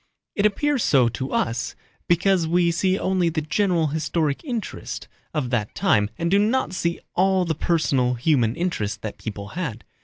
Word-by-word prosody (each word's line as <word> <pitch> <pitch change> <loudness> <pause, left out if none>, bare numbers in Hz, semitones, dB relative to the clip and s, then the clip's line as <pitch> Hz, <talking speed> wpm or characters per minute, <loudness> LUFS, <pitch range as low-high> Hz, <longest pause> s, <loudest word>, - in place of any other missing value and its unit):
It 205 +1 +3
appears 280 +5 0
so 125 -4 +4
to 130 +3 -5
us 120 +1 -1 0.3
because 175 0 +3
we 170 +1 +3
see 185 +3 +1
only 185 -3 +1
the 155 -1 -2
general 175 0 +1
historic 155 -1 -1
interest 240 -7 -5 0.2
of 140 -6 -2
that 110 -4 -1
time 125 - +2
and 170 +1 -1
do 200 - +5
not 220 -1 +1
see 170 -2 -1
all 190 0 +3
the 165 - 0
personal 140 -6 +1
human 120 -3 +2
interests 110 - -2
that 105 0 -7
people 100 -2 -6
had. 150 -11 -4
165 Hz, 165 wpm, -23 LUFS, 125-185 Hz, 0.3 s, do